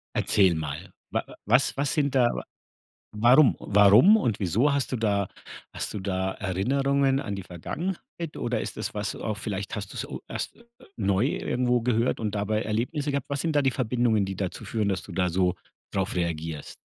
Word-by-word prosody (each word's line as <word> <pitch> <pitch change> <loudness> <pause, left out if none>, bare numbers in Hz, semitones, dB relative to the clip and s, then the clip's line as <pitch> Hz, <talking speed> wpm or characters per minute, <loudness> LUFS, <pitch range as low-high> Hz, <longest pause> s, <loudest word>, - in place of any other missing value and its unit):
Erzähl 95 -4 +3
mal. 80 +4 -5 0.2
Wa - - 0 0.2
was 125 +5 +3
was 140 0 0
sind 140 -3 0
da 125 -2 +5 0.8
warum 120 +6 +5
warum 105 - +6
und 120 - 0
wieso 110 - +2
hast 140 -2 -1
du 130 - 0
da 100 -4 +1 0.5
hast - - -3
du 105 - -3
da 95 -1 -1
Erinnerungen 135 +8 +1
an 110 -8 -4
die 95 - -5
Vergangenheit 165 - -6
oder 120 -2 -1
ist - - -6
das, - - -3
was 105 -2 -2
du - - -8
auch 110 -2 -2
vielleicht 100 -2 -4
hast - - -5
du's - - -3
u - - -7
erst 235 - -6 0.3
neu 100 +2 +2
irgendwo 125 -3 0
gehört 115 0 +1
und 105 -2 -2
dabei 105 +1 0
Erlebnisse 135 +7 -1
gehabt? 140 -1 -3
Was 140 -1 -1
sind 160 -2 -1
da 145 - +5
die 135 - +3
Verbindungen, 120 -4 +1
die 95 0 -4
dazu 95 -1 -4
führen, 110 -3 -1
dass 95 -1 -1
du - - -10
da 90 -1 +1
so 90 +1 +1 0.4
drauf 95 -1 -1
reagierst? 80 -3 -3
110 Hz, 190 wpm, -26 LUFS, 95-135 Hz, 0.8 s, warum